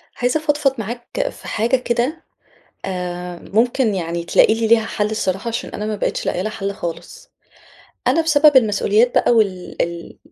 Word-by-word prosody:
عايزة 250 +5 0
أفضفض 295 -3 +1
معاك 240 - -4
في - - -12
حاجة 230 +4 +1
كده، 250 +6 -2 0.6
آآ، 180 -1 -5
ممكن 235 0 +2
يعني 170 -1 -3
تلاقي 195 - +4
لي 225 0 -1
ليها 225 0 +4
حل 210 -1 -2
الصراحة 195 0 -2
عشان 230 0 -3
أنا 210 - -5
ما 215 0 -2
بقيتش - - -2
لاقية 180 - -1
لها 215 +3 -3
حل 200 -1 -3
خالص. 210 - -7 0.8
أنا 330 - +3
بسبب 300 -2 +5
المسؤوليات 220 0 +3
بقى - - +3
وال 200 -6 0
ال 170 0 -6
220 Hz, 165 wpm, -19 LUFS, 190-250 Hz, 0.8 s, بسبب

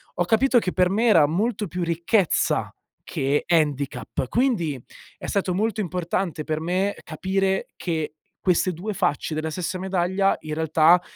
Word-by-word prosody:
Ho 175 - +1
capito 240 +6 +4
che 185 - -2
per 180 -1 +3
me 220 +5 +1
era 165 -9 +6
molto 210 +5 -1
più 175 +2 -3
ricchezza 170 +3 +1 0.3
che 140 +2 0
handicap, 145 -5 0
quindi 180 - 0 0.4
è - - -9
stato 190 -2 0
molto 215 +1 0
importante 175 -2 -2
per 155 0 -2
me 185 +4 0
capire 190 +3 -1
che 160 -4 -3 0.3
queste 185 0 +2
2 205 +6 -4
facce 175 -4 -1
della 155 +1 -2
stessa 180 +3 -3
medaglia, 190 +1 +1
in 155 -1 -5
realtà, 160 +2 +4
180 Hz, 150 wpm, -24 LUFS, 160-195 Hz, 0.4 s, era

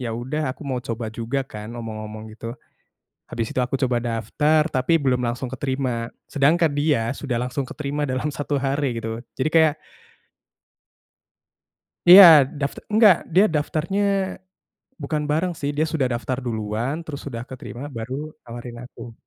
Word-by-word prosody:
ya 120 -2 -3
udah 130 +4 -2
aku 145 +3 -9
mau 130 -2 -2
coba 115 -1 -4
juga 130 +4 -2
kan 105 -2 -8
ngomong-ngomong 110 -1 -7
gitu. 115 0 -7 0.8
Habis 115 -1 -3
itu - - +3
aku 130 +2 -3
coba 130 -3 +1
daftar 150 +8 +1
tapi 155 +4 +1
belum 125 -3 +1
langsung 120 +2 -2
keterima. 130 -3 -3 0.2
Sedangkan 160 +4 +3
dia 145 -6 +1
sudah 125 -5 -2
langsung 125 +3 -2
keterima 145 +2 -3
dalam 130 +2 -1
1 145 0 -2
hari 135 -3 -1
gitu. 115 +1 -5 0.2
Jadi 155 - +2
kayak 160 -2 +4 2.3
Iya, 185 +3 +12 0.4
dafta 140 -1 -3
nggak, 215 -5 +7 0.2
dia 195 - +7
daftarnya, 160 +6 0 1.0
bukan 155 -1 -1
bareng 165 +4 +1
sih 140 0 -2
dia 155 - +2
sudah 140 -5 +1
daftar 125 +2 -3
duluan 110 +3 -2
terus 145 -3 -6
sudah 115 -4 -5
keterima 125 -1 -8
baru 115 +3 -4 0.3
nawarin 120 0 -8
aku. 120 -2 -11
130 Hz, 145 wpm, -23 LUFS, 120-150 Hz, 2.3 s, Iya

